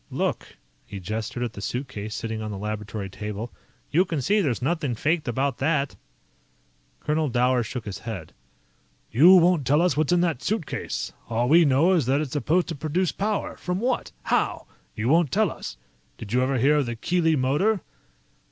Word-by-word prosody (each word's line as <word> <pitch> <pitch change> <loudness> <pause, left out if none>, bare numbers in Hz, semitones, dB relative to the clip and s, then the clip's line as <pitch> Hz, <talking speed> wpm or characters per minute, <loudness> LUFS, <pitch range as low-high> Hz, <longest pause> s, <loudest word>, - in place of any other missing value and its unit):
"Look." - - -3 0.3
He 100 -1 -7
gestured 110 +6 -4
at 120 -2 -3
the 100 - -8
suitcase 110 -2 -4
sitting 110 -1 -4
on 110 - -4
the 100 - -5
laboratory 105 0 -4
table. 105 +3 -6 0.4
"You 170 +5 +4
can 165 -5 -3
see 205 +11 +2
there's 135 - 0
nothing 145 -2 -1
faked 155 +6 0
about 135 +3 -1
that." 145 -1 0 1.1
Colonel 155 0 0
Dower 125 +1 +2
shook 120 +1 -5
his 100 -2 -5
head. 105 -9 -7 0.8
"You 170 +10 +8
won't 175 -3 +4
tell 145 +3 +4
us 180 +1 +2
what's 155 +1 +1
in 175 -1 +4
that 165 -7 0
suitcase. 210 -7 -3 0.2
All 120 +1 +1
we 165 +4 +6
know 145 +6 +4
is 160 -9 +2
that 135 +2 +3
it's 150 -4 -3
supposed 155 +6 +1
to 165 - -3
produce 160 +5 0
power. 210 +1 -2
From 180 +1 -3
what? 245 +3 -1
How? - - 0 0.3
You 110 - -2
won't 160 +1 +3
tell 210 -3 +2
us. - - -8 0.4
Did 110 -1 -8
you 125 - +3
ever 130 +1 +1
hear 140 +5 +4
of 140 -4 +1
the 120 - -3
Keely 165 +6 +1
Motor?" 150 +10 +1
140 Hz, 185 wpm, -25 LUFS, 115-170 Hz, 1.1 s, You